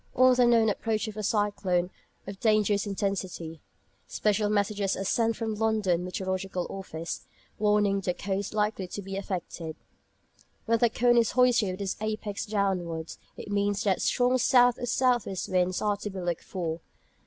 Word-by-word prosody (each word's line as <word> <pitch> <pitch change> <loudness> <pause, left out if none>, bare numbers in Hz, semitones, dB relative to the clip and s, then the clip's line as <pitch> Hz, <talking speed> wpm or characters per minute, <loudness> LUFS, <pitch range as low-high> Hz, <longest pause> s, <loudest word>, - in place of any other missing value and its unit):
On 255 0 +6
the 245 -1 +4
known 230 -2 +4
approach 215 +1 -1
of 215 - -6
a 215 - -4
cyclone 200 -4 0 0.3
of 195 0 -8
dangerous 210 -2 +2
intensity, 185 -5 -3 0.5
special 210 0 +1
messages 205 -1 0
are 195 - -3
sent 225 +3 +1
from 225 -1 -3
the 210 +1 -3
London 205 -6 +1
Meteorological 185 0 -3
Office, 170 -4 -6 0.3
warning 210 -1 +2
the 180 -2 -1
coasts 200 0 -3
likely 210 -3 -1
to 205 - -6
be 195 +1 -6
affected. 180 -4 -5 0.9
When 230 0 +2
the 235 - +4
cone 240 +1 +3
is 230 -2 +3
hoisted 245 -5 +4
with 185 - -7
its 195 -1 -2
apex 215 -1 -3
downwards, 180 -6 -2 0.2
it 205 - -8
means 205 0 0
that 195 -3 +1
strong 250 +1 +2
south 245 -1 +4
or 245 - -3
south 250 -1 +2
west 190 -1 -4
winds 185 -1 +1
are 205 -1 +1
to 205 - -5
be 190 -1 -6
looked 175 -2 -3
for. 170 -3 -4
205 Hz, 170 wpm, -28 LUFS, 185-220 Hz, 0.9 s, On